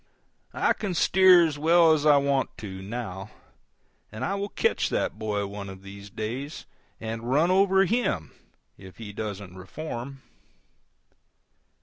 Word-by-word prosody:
I - - +2
can 195 -4 -4
steer 185 -1 +6
as 150 -3 -3
well 165 +1 +5
as 155 -1 +1
I 145 -1 +7
want 140 -1 0
to, 95 -3 -7
now, 100 -2 -6 0.8
and 110 - -4
I 195 - -1
will 200 +1 -3
catch 460 - 0
that - - -2
boy 105 -2 -1
out 100 - -6
one 100 -1 -7
of 95 0 -11
these 100 +1 -10
days 120 +9 -5 0.3
and 115 +1 -5
run 155 +7 +3
over 195 0 +4
HIM 205 - -1 0.5
if 95 -1 -13
he 105 -3 -8
doesn't 100 -3 -6
reform. 130 - -7
120 Hz, 145 wpm, -26 LUFS, 100-165 Hz, 0.8 s, I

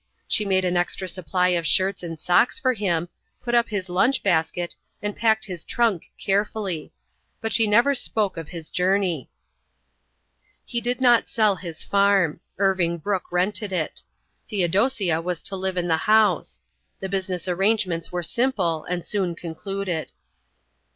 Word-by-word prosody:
She 210 - +3
made 190 -1 +2
an 180 0 0
extra 175 +1 -1
supply 180 0 0
of 170 -3 +1
shirts 190 +4 +2
and 165 -2 -6
socks 180 - +3
for 260 -4 +2
him, 175 -6 -1 0.4
put 240 - -3
up 235 -1 +3
his 200 -4 -3
lunch 190 +10 +2
basket, 175 -1 0 0.2
and 205 0 -4
packed 220 -1 +2
his 180 -5 -5
trunk 225 -8 0
carefully. 195 -4 -1 0.5
But 225 -1 -3
she 225 +1 +4
never 235 +7 +4
spoke 220 -6 0
of 165 -3 -6
his 165 -1 -7
journey. 180 - +1 1.4
He 235 - -3
did 245 +2 -1
not 240 -2 +5
sell 215 -4 +3
his 170 -4 -7
farm. 200 -5 +2 0.2
Irving 185 -3 +1
Brooke 190 +3 -3
rented 190 +3 0
it. 175 -4 -1 0.5
Theodosia 195 -2 +1
was 175 -1 -4
to 195 - -3
live 190 -1 -3
in 175 -1 0
the 160 -1 +2
house. 210 -1 +2 0.4
The 190 - -4
business 185 -2 -2
arrangements 185 -2 0
were 175 -1 -2
simple 180 -5 0
and 175 -1 -3
soon 185 -5 -1
concluded. 175 0 -4
190 Hz, 150 wpm, -24 LUFS, 175-210 Hz, 1.4 s, not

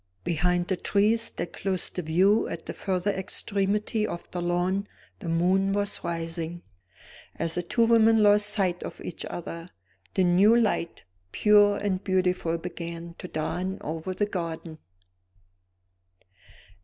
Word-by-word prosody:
Behind 175 +1 +1
the 190 - 0
trees 215 +5 +1
that 170 0 -5
closed 190 -3 -2
the 180 - -1
view 185 +7 +3
at - - -6
the - - -5
further 190 +1 -1
extremity 200 +2 0
of 170 - -6
the 175 - -3
lawn 180 +3 0 0.3
the 175 - -5
moon 185 +4 +2
was 205 0 -2
rising. 165 0 -4 0.7
As 165 0 0
the 175 - 0
two 230 +7 +2
women 225 -1 +5
lost 205 0 +5
sight 190 -4 0
of - - -7
each 170 - -6
other, 170 0 -7 0.5
the 190 - +3
new 185 +6 +5
light, 205 -7 -1 0.3
pure 205 -1 +5
and 190 -2 -2
beautiful, 180 -3 +1
began 170 0 -7
to - - -6
dawn 180 +4 -3
over 160 +4 -4
the 205 - +1
garden. 165 -4 -5
185 Hz, 140 wpm, -27 LUFS, 170-205 Hz, 0.7 s, women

